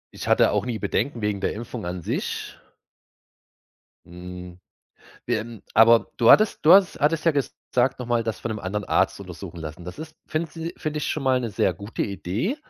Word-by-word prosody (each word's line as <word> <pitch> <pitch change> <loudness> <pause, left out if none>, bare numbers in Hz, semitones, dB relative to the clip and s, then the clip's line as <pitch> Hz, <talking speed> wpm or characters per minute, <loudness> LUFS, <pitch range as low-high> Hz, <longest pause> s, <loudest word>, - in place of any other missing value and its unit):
Ich - - -6
hatte - - +4
auch - - +1
nie 115 - -2
Bedenken 120 +4 -2
wegen 105 -2 -1
der - - 0
Impfung 115 -3 -6
an 90 -1 -5
sich. - - -3 1.5
Hm, 90 0 -10 0.7
ähm, 110 0 -3
aber 115 +1 +6
du 115 - +5
hattest 215 0 +5
du 160 - +8
hast 190 -1 +5
hattest 155 +2 +2
ja 165 - +4
gesagt, 135 -2 -1
noch 125 - -6
mal 120 -1 +1
das 110 -4 -3
von 115 - -5
'nem 110 -1 -4
anderen 105 +3 -3
Arzt - - +1
untersuchen - - -9
lassen. 80 +2 -8
Das 90 +1 -8
ist 155 0 -8
finde 155 0 -2
si 165 +1 -6
finde 155 0 -3
ich - - -3
schon 150 -3 -2
mal 130 -1 +3
'ne 120 -2 -3
sehr - - +1
gute 105 +2 -5
Idee, 105 - -2
115 Hz, 195 wpm, -24 LUFS, 100-150 Hz, 1.5 s, du